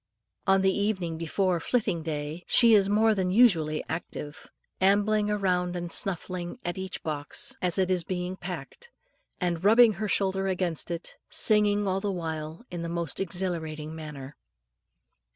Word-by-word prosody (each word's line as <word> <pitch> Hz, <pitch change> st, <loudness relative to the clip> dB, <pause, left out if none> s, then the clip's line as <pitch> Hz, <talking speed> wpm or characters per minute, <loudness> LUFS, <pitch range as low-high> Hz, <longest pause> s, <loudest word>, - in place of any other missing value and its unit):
On 195 Hz, 0 st, +4 dB
the 190 Hz, 0 st, +3 dB
evening 185 Hz, -6 st, -1 dB
before 175 Hz, +2 st, 0 dB
"flitting 180 Hz, -3 st, 0 dB
day" 155 Hz, +1 st, -4 dB
she 235 Hz, -2 st, +5 dB
is 200 Hz, -2 st, +5 dB
more 220 Hz, +2 st, +4 dB
than 190 Hz, -3 st, 0 dB
usually 180 Hz, -8 st, +4 dB
active, 155 Hz, -2 st, -6 dB, 0.3 s
ambling 205 Hz, +2 st, +3 dB
round 180 Hz, -4 st, 0 dB
and 175 Hz, -1 st, -4 dB
snuffing 180 Hz, 0 st, -1 dB
at 175 Hz, +2 st, -3 dB
each 190 Hz, -1 st, -5 dB
box 150 Hz, -2 st, -2 dB
as 180 Hz, -1 st, 0 dB
it 190 Hz, -1 st, +2 dB
is 180 Hz, -2 st, +1 dB
being 180 Hz, +1 st, -3 dB
packed, 180 Hz, -, -8 dB, 0.5 s
and 175 Hz, -2 st, -1 dB
rubbing 225 Hz, +2 st, +7 dB
her 215 Hz, -, 0 dB
shoulder 195 Hz, -1 st, +1 dB
against 180 Hz, -4 st, -1 dB
it, 170 Hz, 0 st, -5 dB
singing 205 Hz, -1 st, +2 dB
all 190 Hz, 0 st, 0 dB
the 205 Hz, -1 st, -1 dB
while 160 Hz, +2 st, -5 dB
in 175 Hz, -1 st, -4 dB
a 170 Hz, -, -4 dB
most 170 Hz, -3 st, -3 dB
exhilarating 165 Hz, -5 st, -3 dB
manner. 150 Hz, -3 st, -8 dB
180 Hz, 150 wpm, -27 LUFS, 165-200 Hz, 0.5 s, rubbing